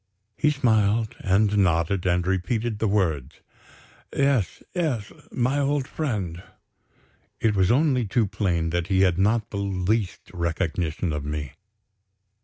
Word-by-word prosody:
He 150 - +2
smiled, 110 -6 +2
and 105 +2 +2
nodded, 90 0 +1
and 90 0 +1
repeated 105 +4 -1
the 110 - +1
words: 80 -9 0 0.8
"Yes, 135 -9 +1
yes, 145 - -1 0.2
my 130 +3 0
old 140 -1 0
friend." 105 - -3 1.0
It 110 -2 +2
was 95 -2 +3
only 130 -3 +2
too 115 +3 +2
plain 85 -5 -1
that 85 0 -1
he 95 -1 +2
had 90 -2 +3
not 110 +2 +1
the 100 - -4
least 100 0 -1
recollection 85 -1 -1
of 75 -1 -3
me. 75 -2 -4
100 Hz, 130 wpm, -25 LUFS, 90-115 Hz, 1.0 s, was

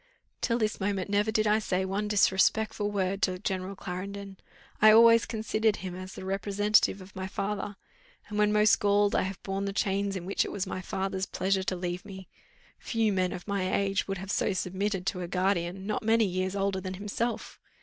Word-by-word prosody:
"Till 235 -1 +1
this 215 -2 -1
moment 195 -1 -2
never 205 +2 +2
did 215 0 +2
I 210 +1 +3
say 190 -3 -1
one 200 +2 -2
disrespectful 210 +1 +2
word 195 -1 -1
to 185 -1 +1
General 190 0 -3
Clarendon. 195 +2 -6 0.4
I 215 0 +9
always 230 +1 +7
considered 220 -1 0
him 185 -3 -6
as 185 +1 -8
the - - -8
representative 200 +1 +2
of 185 +1 -14
my 190 0 -4
father; 200 +1 -3 0.5
and 210 0 -4
when 210 0 +4
most 210 0 +4
galled 205 0 +3
I - - +3
have 190 0 -5
borne 195 0 -2
the 200 - -3
chains 195 +1 0
in 180 -2 -5
which 195 - +1
it - - -5
was 195 -1 -2
my 185 -1 -4
father's 190 +1 -3
pleasure 190 +1 0
to 185 0 -2
leave 180 0 -4
me. 190 -2 -10 0.5
Few 225 -3 0
men 185 -1 +1
of 180 - -7
my 195 -2 -1
age 195 -1 0
would 195 0 -2
have 190 +2 -5
so 205 - +1
submitted 190 +1 -2
to 185 -1 -2
a 175 - -4
guardian 185 0 -1
not 210 +1 -1
many 225 0 +3
years 185 0 -2
older 195 -1 0
than 185 0 -5
himself." 210 +4 -3
195 Hz, 200 wpm, -29 LUFS, 185-210 Hz, 0.5 s, I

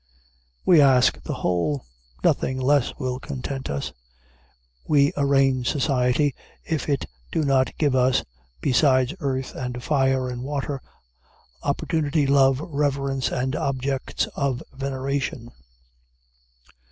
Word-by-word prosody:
We 170 -4 +7
ask 130 -3 +4
the - - -4
whole. 80 -7 -1 0.4
Nothing 130 0 +1
less 135 0 +2
will 130 0 -3
content 135 -1 -5
us. 70 0 -3 0.9
We 145 -1 +4
arraign 135 -2 +2
society 135 0 +1 0.3
if 155 -2 -2
it 140 -3 0 0.3
do 160 - 0
not 135 -2 +1
give 145 -4 +2
us 130 0 +3 0.4
besides 130 0 +3
earth, 135 -4 -2
and 125 -1 -5
fire, 135 -3 +1
and 125 -1 -5
water, 140 0 -3 0.8
opportunity, 150 +1 0
love, 135 -1 +4
reverence, 140 -3 -1
and 130 +2 -1
objects 135 -1 -1
of 135 -3 -1
veneration. 135 -2 -3
135 Hz, 110 wpm, -24 LUFS, 130-140 Hz, 0.9 s, We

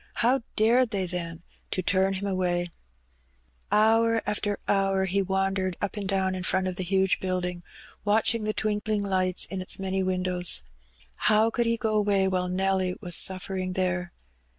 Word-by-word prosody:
How 245 +3 +2
dared 235 +3 +4
they, 195 -3 -1
then, 170 -2 -5 0.3
to 185 - -2
turn 190 +2 +2
him 195 +1 -3
away? 180 -2 0 1.0
Hour 225 +1 +3
after 205 0 -1
hour 195 -1 +2
he 195 +2 +1
wandered 190 -1 -1
up 205 - -3
and 200 -2 -4
down 190 -1 +1
in 185 - -4
front 185 +1 +1
of 185 - -3
the 185 - -2
huge 190 +1 +1
building, 180 -1 -2 0.4
watching 220 +2 +2
the 215 - 0
twinkling 215 -1 -1
lights 185 -2 +1
in 190 -1 -5
its 185 - +1
many 190 0 -2
windows. 180 - -1 0.7
How 215 +1 +4
could 235 +1 0
he 230 0 +1
go 220 -2 -1
away 200 -2 +2
while 185 -1 0
Nelly 185 0 0
was 175 -5 -1
suflfering 185 0 +1
there? 180 -2 -1
190 Hz, 165 wpm, -27 LUFS, 185-210 Hz, 1.0 s, dared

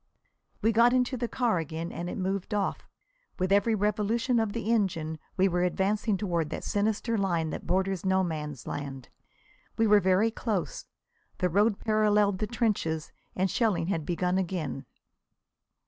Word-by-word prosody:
We 225 - +4
got 235 +2 +5
into 255 +1 +2
the 240 -1 -2
car 230 -7 +1
again 165 +1 -4
and 175 +2 -5
it - - -5
moved 195 +2 -2
off. 200 -1 -2 0.5
With 185 0 -1
every 205 +3 +4
revolution 215 +4 +1
of 220 -2 0
the 230 -1 -2
engine 165 -8 0 0.2
we 190 +1 +4
were 175 -1 0
advancing 195 +3 +1
toward 170 -6 -1
that - - -5
sinister 220 +2 0
line 170 -5 0
that - - -6
borders 190 -1 0
No 190 0 +2
Man's 150 -6 -4
Land. 135 -3 -6 0.7
We 225 - +3
were 210 -1 +6
very 190 +4 +3
close. 215 -5 -3 0.5
The 180 - +1
road 205 +4 +3
paralleled 210 -3 +2
the 215 - -1
trenches, 205 -10 -1 0.2
and 190 0 +1
shelling 210 -7 +1
had 165 -5 -1
begun 180 +3 0
again. 165 -8 -3
195 Hz, 160 wpm, -28 LUFS, 175-215 Hz, 0.7 s, were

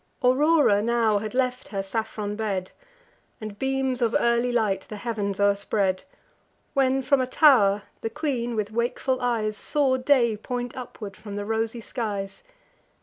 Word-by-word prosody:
Aurora 270 -4 +4
now 225 -2 +2
had 215 +3 -6
left 255 -1 0
her 195 -2 -3
saffron 210 0 -3
bed, 200 -4 -3 0.7
And 215 -1 -8
beams 265 -1 -1
of 235 -1 +1
early 235 +1 +2
light 215 -5 +1
the 215 - -6
heav'ns 205 -3 -3
o'erspread, 200 0 +1 0.7
When, 270 -1 +2
from 275 0 +3
a 255 - -1
tow'r, 220 -9 +5 0.2
the 225 - -2
queen, 240 -3 -2
with 210 -1 -2
wakeful 245 +3 -1
eyes, 225 -3 0
Saw 270 +2 +1
day 255 -4 +3
point 245 +2 -4
upward 220 -5 -8
from 210 -2 -9
the 205 0 -4
rosy 225 +2 -2
skies. 205 -5 -4
230 Hz, 145 wpm, -25 LUFS, 205-255 Hz, 0.7 s, tow'r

